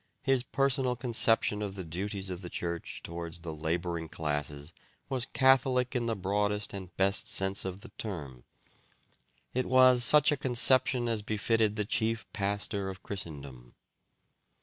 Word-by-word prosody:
His 135 -2 +2
personal 135 -1 0
conception 115 -3 +1
of 100 -2 -4
the 95 - -5
duties 95 +3 -5
of 90 0 -6
the 90 - -7
Church 85 -1 -4
towards 85 0 -5
the 80 -1 -6
labouring 85 +1 -3
classes 75 0 -4 0.4
was 130 -2 -1
catholic 130 -1 +3
in 120 -1 0
the 115 - 0
broadest 105 +2 -1
and 95 -3 -8
best 100 +1 +1
sense 95 0 +1
of 95 +1 -5
the - - -11
term. 70 - -6 1.1
It 130 +1 -1
was 130 -1 +6
such 150 +4 +6
a 150 - +1
conception 130 -1 +3
as 115 -2 -1
befitted 110 0 +1
the 105 -1 -1
chief 115 +2 -1
pastor 100 -1 -1
of 95 -1 -9
Christendom." 70 -10 -8
100 Hz, 150 wpm, -30 LUFS, 85-120 Hz, 1.1 s, was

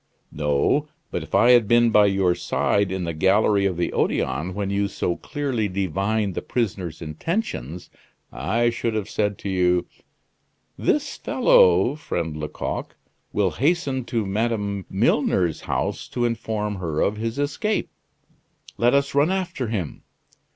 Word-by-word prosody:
"No; 75 - +1 0.2
but - - -2
if - - -4
I 120 - +6
had 120 -4 +5
been 120 +1 +4
by 105 -1 +6
your 95 -2 +2
side 100 +2 0
in 95 -1 -2
the 85 -1 -3
gallery 100 +4 +3
of 90 -3 -3
the 85 - -1
Odeon, 85 +7 -1
when 100 -1 -2
you 100 0 +1
so 90 -3 -2
clearly 130 -5 -2
divined 100 +2 -1
the - - -3
prisoner's 95 -9 -3
intentions, 85 - -4 0.4
I 120 +3 0
should 115 -1 -2
have 105 -3 -2
said 105 -1 -1
to 100 - -5
you: 90 -1 +2 0.9
'This - - 0
fellow, 95 +8 +4
friend 85 - -4
Lecoq, 75 0 -5 0.4
will - - +1
hasten 140 -3 0
to 115 -3 -1
Madame 100 -2 -1
Milner's 85 -4 +1
house - - -2
to 120 -1 -1
inform 110 -3 -2
her 80 -4 -3
of 105 - +1
his 115 +3 -3
escape. 145 +10 -1 0.9
Let 120 +3 +4
us 140 0 +1
run 145 +4 +3
after 175 -9 -2
him. 100 -9 -4
105 Hz, 145 wpm, -23 LUFS, 90-120 Hz, 0.9 s, I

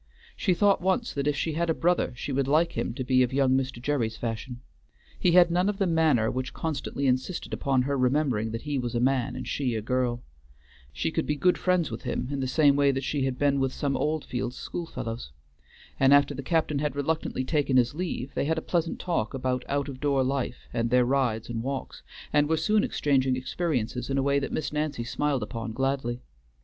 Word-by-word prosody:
She 185 -4 +1
thought 200 0 +3
once 210 +7 0
that 140 0 -2
if 150 - +2
she 155 +3 -1
had 170 +2 -1
a 160 - +2
brother 175 +1 +1
she 135 - -5
would 135 0 0
like 160 +4 +3
him - - -2
to 130 - -3
be 130 0 +3
of 125 0 +2
young 135 -1 +2
Mr. 130 -2 0
Gerry's 120 -4 -1
fashion. 120 +1 -4 0.6
He 175 - +3
had 175 -1 +6
none 180 +3 +2
of 205 - -2
the 195 - +1
manner 160 -10 +3
which 130 +1 -4
constantly 145 -3 -3
insisted 130 +7 -1
upon 135 -3 +1
her 140 +2 -1
remembering 130 -4 +1
that 115 +1 -5
he 145 -2 -1
was 120 -1 -3
a - - +2
man 130 0 +1
and 130 -2 -6
she 125 -4 -1
a 110 - -1
girl; 125 0 -1 0.7
she 70 -1 -2
could - - -1
be 150 - +1
good 180 +5 +3
friends 180 -4 +1
with - - -5
him - - -3
in 140 - -2
the 130 - -1
same 140 +1 +4
way 140 0 +4
that 135 0 0
she 140 0 -1
had 130 -1 -2
been 140 0 +2
with 135 -1 +1
some 140 0 -1
Oldfields 130 -5 -2
schoolfellows, 115 - -5 0.7
and 135 +1 +6
after 145 0 +3
the - - -5
captain 155 0 0
had 150 -1 -1
reluctantly 145 -2 -1
taken 140 -1 +1
his 120 0 +3
leave, 150 -6 -4
they - - -1
had 160 +2 0
a - - -1
pleasant 170 -2 -1
talk 150 -11 -1
about 125 -1 -1
out 140 0 0
of 135 -2 -7
door 140 -2 +2
life 130 -1 -2
and 115 0 0
their 125 +1 +4
rides 120 -4 0
and 115 -1 -3
walks, 135 +2 -5 0.3
and 145 0 +3
were 160 - +2
soon 215 +5 +2
exchanging 135 - +1
experiences 130 -3 -2
in 135 - 0
a 135 - +2
way 140 0 +2
that 140 - -4
Miss 155 - -3
Nancy 150 -5 -1
smiled 140 +1 -1
upon 115 +1 -5
gladly. 130 -1 -1
135 Hz, 220 wpm, -27 LUFS, 125-150 Hz, 0.7 s, had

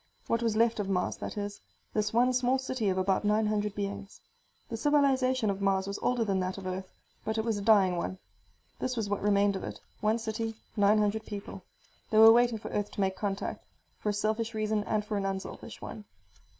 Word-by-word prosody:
What 230 - 0
was 225 -2 +1
left 230 0 +3
of 200 -1 -2
Mars, 180 -2 0
that - - -6
is; 205 0 -4 0.3
this 215 0 0
one 245 +3 +3
small 250 +1 +2
city 260 -5 -1
of 185 - 0
about 190 +2 +1
nine 210 +1 +2
hundred 210 -1 -1
beings. 200 0 -5 0.5
The 230 - -4
civilization 260 -4 +2
of 195 0 -5
Mars 195 -1 +2
was 200 +1 -4
older 245 -2 +1
than 195 -2 +1
that 185 +1 -2
of 195 - -8
Earth, 185 0 -4 0.3
but 220 0 -2
it 220 - 0
was 220 -3 0
a - - -5
dying 200 -4 +5
one. 185 +2 -3 0.6
This 255 -1 -2
was 215 -3 -1
what 205 - -1
remained 200 -1 +3
of 190 - -4
it: - - -6 0.2
one 215 +2 +2
city, 225 0 -3 0.2
nine 205 0 +4
hundred 210 +1 +1
people. 200 -2 -7 0.5
They 215 - +1
were 225 +1 +10
waiting 240 -1 +3
for - - -7
Earth 205 0 -2
to - - -2
make 190 -1 +1
contact, 195 0 -3 0.4
for 210 - -1
a - - +1
selfish 220 +2 -1
reason 215 -1 0
and 210 -1 0
for 210 -1 -2
an 195 - -1
unselfish 190 0 -6
one. 210 - -8
210 Hz, 215 wpm, -30 LUFS, 200-225 Hz, 0.6 s, were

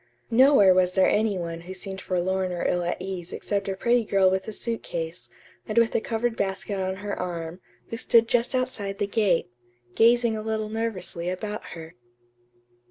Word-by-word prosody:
Nowhere 240 -6 +6
was 180 0 +2
there 190 0 +4
any 210 -2 +2
one 170 -1 -5
who 185 +2 -8
seemed 190 0 -6
forlorn 185 +1 -1
or 175 -1 -2
ill 175 - +1
at 175 - -2
ease 180 -2 -6
except 200 -1 -2
a 195 - -2
pretty 235 +4 +2
girl 195 -3 +3
with 190 +1 -1
a - - -3
suit 230 +2 -3
case, 165 +1 -5 0.4
and 215 - -4
with 230 -1 +4
a - - +1
covered 230 +1 -1
basket 195 0 -2
on 190 0 -1
her 205 - -2
arm, 175 -1 -5 0.3
who 230 - -4
stood 230 -1 +4
just 240 +2 +1
outside 210 -6 -2
the 205 - 0
gate, 200 - +1 0.4
gazing 235 0 +4
a 215 - -4
little 215 0 -2
nervously 190 -6 -3
about 210 +3 -4
her. 165 -1 -9
195 Hz, 185 wpm, -25 LUFS, 180-225 Hz, 0.4 s, Nowhere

